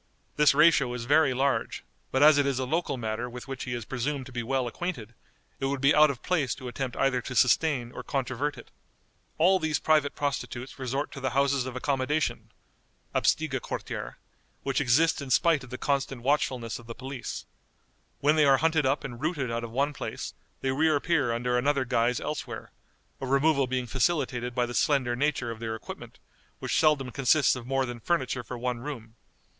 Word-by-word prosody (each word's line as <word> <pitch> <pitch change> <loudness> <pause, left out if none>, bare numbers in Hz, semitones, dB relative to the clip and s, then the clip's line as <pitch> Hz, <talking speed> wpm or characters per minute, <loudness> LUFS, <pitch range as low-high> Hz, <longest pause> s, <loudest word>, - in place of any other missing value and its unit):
This 150 -1 +5
ratio 150 -4 +5
is 120 -1 -5
very 145 +1 +4
large, 135 +1 0 0.3
but 130 +2 +3
as 150 -1 +7
it 140 - +2
is 135 -2 0
a 130 - -1
local 150 0 -1
matter 115 +1 -3
with 125 +2 -9
which 135 -1 -5
he 125 - -3
is 120 -3 -5
presumed 135 +3 -3
to 130 - -11
be 120 -1 -3
well 130 +2 0
acquainted, 120 - -5 0.5
it 135 - 0
would 140 0 -2
be 140 +2 +4
out 150 0 +6
of 135 -4 -5
place 155 -9 0
to 130 - -8
attempt 125 0 -4
either 130 -2 +2
to 125 - -6
sustain 125 -2 +3
or - - -7
controvert 135 +2 -2
it. - - -13 0.7
All 185 +4 +4
these 160 -2 0
private 155 -2 +2
prostitutes 135 -3 -4
resort 135 +2 -2
to - - -8
the 130 -1 -1
houses 140 -2 +2
of 130 - -6
accommodation 140 +3 -1 0.6
(Absteigequartiere), 145 -5 -1 0.5
which 135 0 0
exist 155 +5 +3
in 140 - -6
spite 160 0 +3
of 125 - -11
the 130 - -6
constant 135 -3 -1
watchfulness 130 -5 0
of 120 - -14
the 115 - -7
police. 130 -1 -6 0.8
When 150 +2 +4
they 150 - +5
are 135 -1 +6
hunted 155 -1 +2
up 135 +3 0
and 120 -2 -7
rooted 150 -6 -1
out 115 0 -2
of 115 - -5
one 140 +5 0
place, - - -5 0.3
they 135 - 0
reappear 150 -1 +2
under 125 +1 0
another 140 0 +1
guise 120 0 +1
elsewhere; 150 - -5 0.5
a 135 - -4
removal 140 0 +3
being 125 0 -1
facilitated 125 -1 0
by 125 - +2
the 120 - -6
slender 130 -3 +2
nature 135 -3 0
of 115 - -8
their 110 -1 -3
equipment, 110 - -9 0.4
which - - 0
seldom 150 -5 +2
consists 135 +2 +3
of 125 -1 -8
more 135 0 +1
than 120 -1 -6
furniture 130 -2 -1
for 120 +2 -7
one 125 0 -2
room. 120 -4 -7
135 Hz, 195 wpm, -28 LUFS, 125-145 Hz, 0.8 s, as